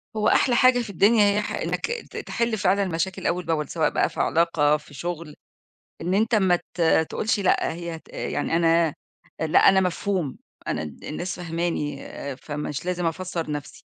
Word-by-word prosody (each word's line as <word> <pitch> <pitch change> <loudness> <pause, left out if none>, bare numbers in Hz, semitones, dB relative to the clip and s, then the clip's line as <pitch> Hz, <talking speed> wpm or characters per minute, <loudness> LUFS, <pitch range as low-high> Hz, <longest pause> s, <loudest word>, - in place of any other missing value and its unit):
هو 210 0 +1
أحلى 245 -3 +4
حاجة 255 0 +5
في 230 -3 -4
الدنيا 205 +3 +4
هي 210 - +2
ح 210 - -5
إنك - - -2 0.2
ت - - -7
تحل 235 -2 -1
فعلًا 195 +2 +2
المشاكل 185 +1 -2
أول 180 0 -1
بأول، 150 -3 -1
سواء 160 -2 +1
بقى - - +1
في - - -9
علاقة 160 -3 +3
في 150 -1 -17
شغل، 170 0 -5 0.7
إن 180 +3 -1
أنت 225 +3 +2
ما 190 -4 +4
ت 175 - -12
آآ، 160 -1 +4
تقولش 210 +6 -1
لأ 190 - +2
هي 170 -1 -6
ت - - -23
يعني 165 - -2
أنا 165 -2 +3 0.5
لأ 160 -1 +3
أنا 190 0 +5
مفهوم، 180 -5 -1 0.3
أنا 75 - -1
ال 75 -2 -9
الناس 175 +4 -4
فاهماني 165 -4 -3
آآ، 140 -1 -6
فمش 150 +2 -5
لازم 180 -1 -1
أفسر 170 -1 -3
نفسي، 145 -1 -6
170 Hz, 185 wpm, -24 LUFS, 160-195 Hz, 0.7 s, حاجة